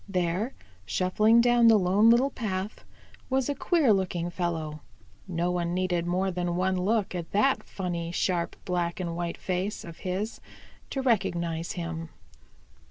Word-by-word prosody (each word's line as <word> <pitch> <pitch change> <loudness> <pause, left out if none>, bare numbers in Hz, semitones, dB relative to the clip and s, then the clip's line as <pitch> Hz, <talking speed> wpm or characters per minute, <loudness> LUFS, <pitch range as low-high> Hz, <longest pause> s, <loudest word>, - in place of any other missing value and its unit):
There, 185 +6 -1 0.3
shuffling 210 - +3
down 240 -1 +5
the 225 -1 +7
Lone 200 +4 +4
Little 250 +4 +4
Path, 200 -3 -4 0.4
was 265 0 +1
a - - +1
queer 285 - +3
looking 175 -3 -1
fellow. 160 -4 -3 0.5
No 175 -1 -1
one 175 -1 -1
needed 180 -2 0
more 185 +2 +1
than 175 -1 -2
one 185 +1 +1
look 200 +3 0
at 170 -2 -5
that 265 +7 +3
funny, 170 -3 -4
sharp, 175 -1 0
black 175 -1 -1
and 170 -2 -3
white 170 0 -3
face 185 +3 -2
of 170 -1 -10
his 190 +4 -3 0.5
to 270 - -2
recognize 170 -7 0
him. 165 -3 -5
185 Hz, 150 wpm, -28 LUFS, 170-215 Hz, 0.5 s, the